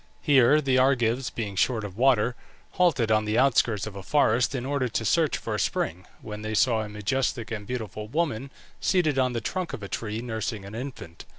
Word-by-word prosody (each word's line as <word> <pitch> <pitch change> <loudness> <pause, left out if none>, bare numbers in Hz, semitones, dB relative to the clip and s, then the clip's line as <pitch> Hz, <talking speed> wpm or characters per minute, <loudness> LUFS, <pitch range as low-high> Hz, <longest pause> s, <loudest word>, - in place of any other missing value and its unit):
Here 145 0 +5
the 130 -3 +2
Argives, 130 -1 +2
being 105 -4 -5
short 110 +3 +1
of 100 -3 -7
water, 125 -1 +3 0.4
halted 155 -11 +2
on 110 0 +3
the 105 +1 0
outskirts 115 -6 +3
of 110 -2 -8
a 100 - -6
forest 130 +3 +2
in 125 -1 -3
order 140 -2 0
to 115 -1 -2
search 155 +6 +2
for 115 - -5
a 105 - -1
spring, 90 0 -2 0.2
when 105 0 -7
they 110 0 -3
saw 115 0 +3
a 105 - -5
majestic 115 +3 -2
and 105 -2 -5
beautiful 110 -3 -5
woman 140 -1 -1 0.3
seated 155 -7 +2
on 130 -1 +2
the 115 - -2
trunk 180 - -3
of 120 -7 -6
a - - -5
tree, 105 +1 -4
nursing 110 -3 -4
an 100 - -9
infant. 115 -9 -8
115 Hz, 205 wpm, -26 LUFS, 105-135 Hz, 0.4 s, Here